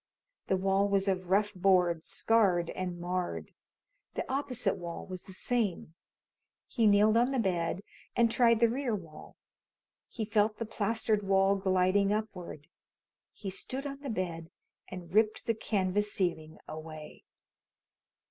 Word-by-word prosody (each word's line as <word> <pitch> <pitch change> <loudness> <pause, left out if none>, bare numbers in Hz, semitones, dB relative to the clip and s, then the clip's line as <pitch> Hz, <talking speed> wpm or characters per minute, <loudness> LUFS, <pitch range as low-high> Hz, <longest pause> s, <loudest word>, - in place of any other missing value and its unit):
The 190 - +2
wall 195 +1 +2
was 200 0 +1
of 185 -2 -1
rough 205 +2 +2
boards, 180 -3 +2
scarred 190 -7 +2
and 180 -2 -4
marred. 180 +1 -3 0.6
The - - -3
opposite 255 -7 -1
wall 170 -1 -6
was 185 -1 -7
the - - -11
same. 200 -5 -1 0.7
He 230 -4 +2
kneeled 210 +2 +5
on 240 +2 +4
the 270 - -1
bed 185 -3 0 0.3
and 235 -1 +3
tried 230 -2 +4
the 235 - +7
rear 245 -1 -1
wall. 165 -6 -10 0.7
He 220 - -4
felt 215 0 +1
the 230 - -3
plastered 220 0 0
wall 195 0 +3
gliding 190 +1 +2
upward. 195 -8 -4 0.7
He 195 -3 -6
stood 260 +8 -4
on 275 -1 -5
the 280 -1 -6
bed 175 -6 -3 0.4
and 180 -2 -9
ripped 215 +2 +2
the 230 - +2
canvas 205 -1 0
ceiling 160 -5 -2
away. 155 -1 -9
195 Hz, 140 wpm, -31 LUFS, 180-220 Hz, 0.7 s, the